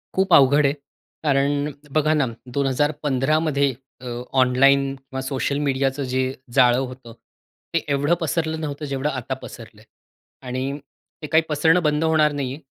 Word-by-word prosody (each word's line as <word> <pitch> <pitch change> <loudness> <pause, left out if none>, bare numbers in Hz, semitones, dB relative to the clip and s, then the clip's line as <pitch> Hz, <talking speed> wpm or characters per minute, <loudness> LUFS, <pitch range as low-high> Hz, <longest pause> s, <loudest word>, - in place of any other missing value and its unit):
खूप 190 -2 +2
अवघड 140 +2 +6
आहे. 140 - +3 0.5
कारण 145 0 +1 0.2
बघा 155 0 +2
ना, 150 -3 +2 0.2
2015 140 +2 0
मध्ये 140 -4 +1 0.3
अ, - - -11 0.4
ऑनलाईन 135 +2 +4
किंवा 130 0 -7
सोशल 135 +1 -2
मीडियाचं 135 0 0
जे 130 - +1 0.3
जाळं 125 -2 +5
होतं, 125 -3 -6 0.6
ते 165 - +3
एवढं 145 +4 +1
पसरलं 160 0 -1
नव्हतं 150 0 -4
जेवढं 140 +1 -2
आता 130 -2 -4
पसरलंय. 110 -2 -11 0.6
आणि 130 0 -4 0.6
ते 150 - -5
काही 160 +2 +3
पसरणं 160 +4 +3
बंद 150 0 +1
होणार 155 -2 +3
नाहीये, 140 -2 -4
140 Hz, 140 wpm, -22 LUFS, 130-150 Hz, 0.6 s, अवघड